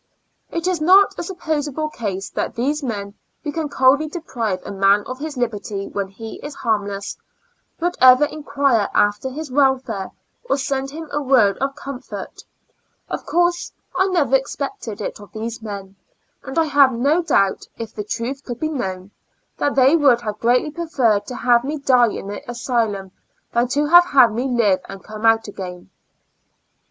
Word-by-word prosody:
It 335 Hz, 0 st, -3 dB
is 360 Hz, -4 st, 0 dB
not 380 Hz, +5 st, +6 dB
a -, -, -1 dB
suppos 315 Hz, -5 st, -2 dB
able 310 Hz, +2 st, -3 dB
case 200 Hz, -9 st, -4 dB
that -, -, -3 dB, 0.2 s
men 205 Hz, -6 st, -4 dB, 0.3 s
who 295 Hz, -, -3 dB
can 315 Hz, -1 st, -3 dB
coldly 280 Hz, +3 st, +3 dB
deprive 240 Hz, -, -3 dB
a -, -, -6 dB
man 200 Hz, +1 st, +3 dB
of 255 Hz, +1 st, -6 dB
his 300 Hz, -2 st, -5 dB
liberty 210 Hz, -4 st, -3 dB
when 200 Hz, -1 st, -3 dB
he 220 Hz, +3 st, -9 dB
is 290 Hz, 0 st, -7 dB
harmless, 205 Hz, -3 st, -2 dB, 0.6 s
would 350 Hz, +1 st, -1 dB
ever 255 Hz, +2 st, +8 dB
enquire 280 Hz, -7 st, 0 dB
after 205 Hz, +5 st, +2 dB
his 290 Hz, +1 st, -7 dB
welfare, 265 Hz, -7 st, +1 dB, 0.4 s
or 275 Hz, -, +2 dB
send 270 Hz, 0 st, -2 dB
him 320 Hz, +3 st, -8 dB
a 295 Hz, +1 st, -1 dB
word 255 Hz, -8 st, +3 dB
of 275 Hz, +1 st, -1 dB
comfort; 275 Hz, -2 st, -8 dB, 0.7 s
of -, -, -5 dB
course 345 Hz, 0 st, +1 dB, 0.2 s
I 375 Hz, +1 st, +3 dB
never 320 Hz, -8 st, +2 dB
expected 265 Hz, -5 st, -3 dB
it -, -, -4 dB
of 205 Hz, -, -13 dB
these 225 Hz, +1 st, -5 dB
men, 200 Hz, -3 st, -7 dB, 0.5 s
and 270 Hz, +3 st, -7 dB
I 325 Hz, -, +4 dB
have 280 Hz, -3 st, +5 dB
no 280 Hz, +9 st, +2 dB
doubt, 200 Hz, -, +1 dB
if 225 Hz, -1 st, -6 dB
the 210 Hz, -, -4 dB
truth 240 Hz, +6 st, -4 dB
could 240 Hz, -2 st, -6 dB
be 310 Hz, -, -1 dB
known, 190 Hz, -9 st, -4 dB, 0.5 s
that 285 Hz, -, 0 dB
they 270 Hz, +3 st, +5 dB
would 275 Hz, -7 st, +4 dB
have 210 Hz, -2 st, -5 dB
greatly 250 Hz, +5 st, +2 dB
preferred 265 Hz, -11 st, 0 dB
to 250 Hz, -, -6 dB
have 240 Hz, -1 st, +3 dB
had -, -, -17 dB
me 295 Hz, +3 st, -3 dB
die 255 Hz, -4 st, +4 dB
in -, -, -6 dB
the 205 Hz, -, -5 dB
asylum 230 Hz, -6 st, -1 dB, 0.4 s
than 235 Hz, +1 st, +2 dB
to 290 Hz, +4 st, +1 dB
have 345 Hz, +3 st, +7 dB
had 255 Hz, -9 st, +5 dB
me 245 Hz, +4 st, -1 dB
live 230 Hz, -7 st, +2 dB
and 195 Hz, 0 st, -9 dB
come 215 Hz, +1 st, -2 dB
out 225 Hz, 0 st, +3 dB
again. 180 Hz, -3 st, -8 dB
255 Hz, 175 wpm, -21 LUFS, 210-290 Hz, 0.7 s, ever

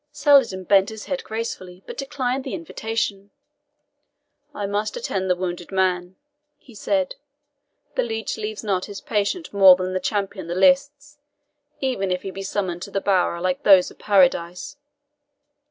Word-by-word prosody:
Saladin 265 Hz, -10 st, +3 dB
bent 195 Hz, +1 st, +4 dB
his 220 Hz, -1 st, -8 dB
head 275 Hz, -2 st, -3 dB
gracefully, 190 Hz, -5 st, -6 dB
but -, -, -8 dB
declined 270 Hz, -2 st, -2 dB
the -, -, -4 dB
invitation. 220 Hz, -10 st, -3 dB, 1.2 s
"I 205 Hz, -, -4 dB
must 205 Hz, -, -2 dB
attend 190 Hz, -, -2 dB
the 180 Hz, -, +3 dB
wounded 175 Hz, -1 st, -5 dB
man," 185 Hz, -1 st, 0 dB, 0.4 s
he 250 Hz, -, -18 dB
said. 195 Hz, -3 st, -1 dB, 0.8 s
"The -, -, +1 dB
leech 225 Hz, -, -3 dB
leaves 215 Hz, 0 st, -5 dB
not 190 Hz, -3 st, -1 dB
his 205 Hz, -1 st, -8 dB
patient 215 Hz, -, -2 dB
more 195 Hz, -2 st, +8 dB
than 185 Hz, 0 st, -3 dB
the 185 Hz, -, 0 dB
champion 195 Hz, -3 st, -3 dB
the 170 Hz, -, -3 dB
lists, 285 Hz, +5 st, +2 dB, 0.6 s
even 250 Hz, -8 st, -1 dB
if 180 Hz, 0 st, -2 dB
he 195 Hz, -, -5 dB
be 195 Hz, -, -7 dB
summoned 190 Hz, -3 st, -3 dB
to 200 Hz, +1 st, -5 dB
a -, -, +3 dB
bower 185 Hz, -3 st, +1 dB
like 180 Hz, +1 st, -1 dB
those 190 Hz, -3 st, +6 dB
of -, -, -18 dB
Paradise. 180 Hz, -2 st, +2 dB
200 Hz, 155 wpm, -23 LUFS, 185-225 Hz, 1.2 s, more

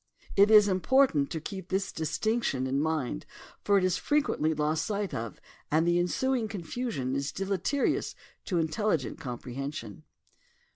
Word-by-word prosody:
It 200 Hz, +1 st, +6 dB
is 210 Hz, -2 st, +8 dB
im 190 Hz, -2 st, +1 dB
portant 255 Hz, -, +3 dB
to 160 Hz, -, -3 dB
keep 190 Hz, +3 st, -7 dB
this 190 Hz, 0 st, -1 dB
distinction 160 Hz, -, -1 dB
in 135 Hz, +2 st, 0 dB
mind 150 Hz, -, -1 dB, 0.4 s
for 200 Hz, -1 st, +4 dB
it 190 Hz, -, +2 dB
is 185 Hz, -2 st, +2 dB
fre 295 Hz, -, -1 dB
quently 160 Hz, -, +1 dB
lost 155 Hz, +1 st, +1 dB
sight 205 Hz, -2 st, -2 dB
of 115 Hz, -1 st, -5 dB, 0.3 s
and 160 Hz, +2 st, +2 dB
the 175 Hz, 0 st, +3 dB
ensuing 240 Hz, +7 st, 0 dB
confusion 195 Hz, -, -3 dB
is 140 Hz, +1 st, -2 dB
deleterious 195 Hz, +8 st, -1 dB, 0.3 s
to 185 Hz, -, -1 dB
intelligent 160 Hz, -, 0 dB
comprehension. 125 Hz, -2 st, -6 dB
175 Hz, 150 wpm, -29 LUFS, 145-210 Hz, 0.4 s, is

